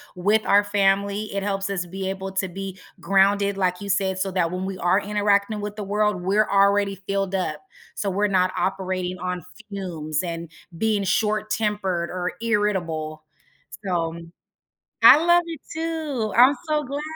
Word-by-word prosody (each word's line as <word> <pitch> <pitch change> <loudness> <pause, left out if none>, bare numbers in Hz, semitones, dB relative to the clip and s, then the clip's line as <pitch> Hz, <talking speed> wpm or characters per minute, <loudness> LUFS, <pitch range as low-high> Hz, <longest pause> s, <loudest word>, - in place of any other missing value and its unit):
with 205 +4 +2
our 205 +1 +5
family. 200 0 +1
It 195 - -1
helps 195 0 -2
us 180 -2 -2
be 190 +1 -5
able 190 0 -4
to 190 0 0
be 190 +1 -7 0.2
grounded, 200 +1 +2
like 180 -1 0
you 200 - -6
said, 190 0 0
so 195 - 0
that 175 -3 0
when 185 +1 -3
we 190 -1 -4
are 180 +3 +2
interacting 205 +1 +1
with 205 0 -5
the 215 - -5
world, 205 -1 0
we're 205 +4 +2
already 200 -1 +2
filled 195 -1 -1
up, 190 - -2 0.3
so 200 -2 -2
we're 205 +2 +1
not 185 -2 +2
operating 185 -1 -2
on 180 -1 -4 0.3
fumes 165 -6 -3
and 170 -2 -5 0.3
being 215 -1 +1
short-tempered 210 -4 0
or 180 0 -3
irritable. 170 -9 -1 0.6
So 170 -4 -1 0.9
I - - +10
love 345 0 +6
it 325 -4 -7
too, 315 -8 -2
I'm 260 +4 +7
so 300 -1 +1
glad. 280 +2 -4
195 Hz, 160 wpm, -23 LUFS, 185-210 Hz, 0.9 s, I